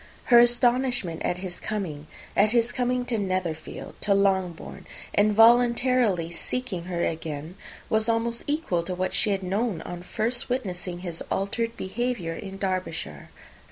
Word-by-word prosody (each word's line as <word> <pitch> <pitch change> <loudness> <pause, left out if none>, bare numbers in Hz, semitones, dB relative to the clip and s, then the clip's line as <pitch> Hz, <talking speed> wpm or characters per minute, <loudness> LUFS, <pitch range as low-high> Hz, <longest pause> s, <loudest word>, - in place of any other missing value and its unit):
Her 240 - +11
astonishment 240 -6 +2
at 175 - 0
his 180 -1 -6
coming 165 -9 -4 0.3
at 215 - +5
his 235 0 +3
coming 250 0 0
to 235 -3 -1
Netherfield, 185 -5 -3
to 200 -1 +2
Longbourn, 190 -4 0 0.3
and 210 +1 +4
voluntarily 235 -5 +4
seeking 190 0 -3
her 175 -2 -1
again, 160 0 -4 0.3
was 220 +1 +2
almost 230 +1 0
equal 290 - 0
to 180 +2 -4
what 185 +1 -1
she 215 - +2
had 195 -1 0
known 195 -1 -1
on 175 0 -6
first 235 +8 -2
witnessing 180 -8 -3
his 175 -3 -5
altered 230 +4 -1
behaviour 205 -4 -2
in 195 +2 -7
Derbyshire. 185 -2 -3
200 Hz, 145 wpm, -26 LUFS, 180-240 Hz, 0.3 s, Her